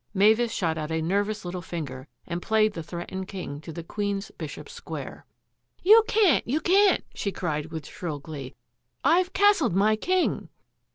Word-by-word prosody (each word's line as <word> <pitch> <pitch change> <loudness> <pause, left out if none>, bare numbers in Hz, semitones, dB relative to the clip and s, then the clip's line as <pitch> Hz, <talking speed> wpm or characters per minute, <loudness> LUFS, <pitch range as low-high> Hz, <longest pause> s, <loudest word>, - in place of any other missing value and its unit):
Mavis 220 +4 +4
shot 165 -6 -1
out 155 0 -4
a 160 - 0
nervous 200 +5 -1
little 175 0 -4
finger 145 -6 -6 0.2
and 170 0 -4
played 215 0 +2
the 165 - -5
threatened 175 +3 -6
king 150 -8 -6
to 160 - -8
the 165 +1 -7
queen's 200 +2 -3
bishop's 160 - -8
square. 475 - -8 0.3
" - - -39
You 435 +4 +8
can't, 410 - +3
you 280 +6 +1
can't! 390 +4 +4
" - - -31
she 200 - -2
cried 155 -5 -3
with 160 -2 -7
shrill 160 -3 -5
glee. 140 -3 -8 0.3
" 120 - -51
I've 350 +5 +3
castled 390 - +4
my 210 +3 +4
king 365 +10 0
195 Hz, 180 wpm, -26 LUFS, 160-240 Hz, 0.3 s, You